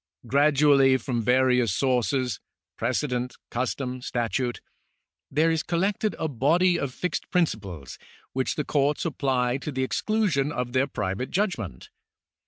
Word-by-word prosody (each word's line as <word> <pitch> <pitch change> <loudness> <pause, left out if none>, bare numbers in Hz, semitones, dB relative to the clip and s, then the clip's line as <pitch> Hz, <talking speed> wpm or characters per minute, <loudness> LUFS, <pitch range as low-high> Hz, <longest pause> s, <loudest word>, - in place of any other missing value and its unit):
Gradually 140 0 +4
from 120 -1 -2
various 125 0 +3
sources 125 0 0 0.2
— - - -42
^precedent, 125 +1 -1 0.2
custom, 130 +1 -2
sta.tute 120 +1 -2 0.4
— - - -58
there 165 +1 +4
is 160 -1 +1
collected 195 +6 0
a 160 - -1
body 170 +7 +2
of 140 - -2
fixed 180 +7 -3
principles 100 - -2 0.3
which 130 0 -1
the 150 - -2
courts 145 +2 +1
apply 130 -5 0
to 150 - -5
the 130 -1 -1
ex 130 - -1
clusion 185 -11 +1
of 125 -3 -3
their 135 +1 +2
private 105 -1 -3
judgment. 175 - -2
130 Hz, 140 wpm, -26 LUFS, 125-150 Hz, 0.4 s, Gradually